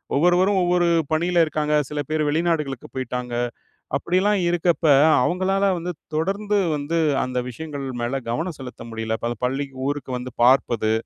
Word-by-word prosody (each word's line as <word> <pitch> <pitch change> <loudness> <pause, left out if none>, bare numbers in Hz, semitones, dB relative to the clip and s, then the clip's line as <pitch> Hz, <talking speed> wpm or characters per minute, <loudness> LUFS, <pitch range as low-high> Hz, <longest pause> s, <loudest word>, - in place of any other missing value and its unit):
ஒவ்வொருவரும் 180 +5 +3
ஒவ்வொரு 175 0 +2 0.2
பணியில 170 +2 +3
இருக்காங்க, 150 -1 -1 0.2
சில 150 0 -4
பேர் 155 0 0
வெளிநாடுகளுக்கு 150 -4 -1
போய்ட்டாங்க, 125 -1 -4 0.7
அப்படிலாம் 190 +6 +1
இருக்கப்ப 170 -1 +1 0.4
அவங்களால 190 +2 +1
வந்து 175 +1 -4 0.2
தொடர்ந்து 200 +5 0 0.2
வந்து 150 +4 -2 0.3
அந்த 125 0 -2
விஷயங்கள் 145 +1 -6 0.2
மேல 130 +3 -1
கவனம் 160 +6 -3
செலுத்த 125 -2 -8
முடியல. 110 0 -2
இப்ப 115 - -2
அந்த 120 - -6
பள்ளிக்கு, 135 +1 -3
ஊருக்கு 145 -2 -3
வந்து 125 -1 -7
பார்ப்பது, 120 -4 +3
155 Hz, 140 wpm, -23 LUFS, 130-175 Hz, 0.7 s, ஒவ்வொருவரும்